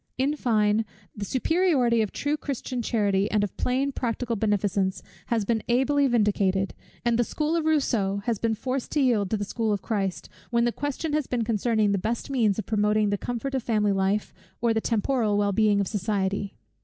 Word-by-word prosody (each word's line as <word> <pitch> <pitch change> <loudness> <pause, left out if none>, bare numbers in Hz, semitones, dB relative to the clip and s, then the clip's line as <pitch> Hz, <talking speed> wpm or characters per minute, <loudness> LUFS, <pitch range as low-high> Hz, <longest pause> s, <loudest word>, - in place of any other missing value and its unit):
In 275 +3 +1
fine, 215 -5 +2 0.3
the 205 - -4
superiority 260 - +2
of 215 - -1
true 290 +1 -1
Christian 265 -4 -4
charity 205 -3 +1
and 210 -1 +1
of 205 - -3
plain 265 +3 0
practical 240 -2 -2
beneficence 200 -2 0 0.2
has 225 -3 0
been 225 0 0
ably 275 +4 +3
vindicated; 200 -5 +1 0.3
and 235 0 +2
the - - +5
school 305 +6 -1
of 330 -2 0
Rousseau 220 -11 +1
has 230 -4 0
been 225 -1 0
forced 255 +3 -3
to 300 - +2
yield 230 -8 +2
to 220 - 0
the 205 - -3
school 225 +1 -1
of 200 -2 -1
Christ, 195 -5 -2 0.2
when 235 0 +2
the 240 - +2
question 290 +4 -3
has 300 -3 0
been 240 -2 -1
concerning 220 -1 +1
the 200 - +1
best 230 +7 -3
means 225 -7 +2
of 220 - -3
promoting 210 -1 +2
the 205 - +1
comfort 245 +3 -4
of 265 - 0
family 215 -3 +1
life, 195 +2 0 0.3
or 235 -1 +2
the 220 - 0
temporal 225 -2 +1
well 205 0 +2
being 210 0 +3
of 200 - 0
society. 200 - -2
225 Hz, 195 wpm, -26 LUFS, 205-250 Hz, 0.3 s, the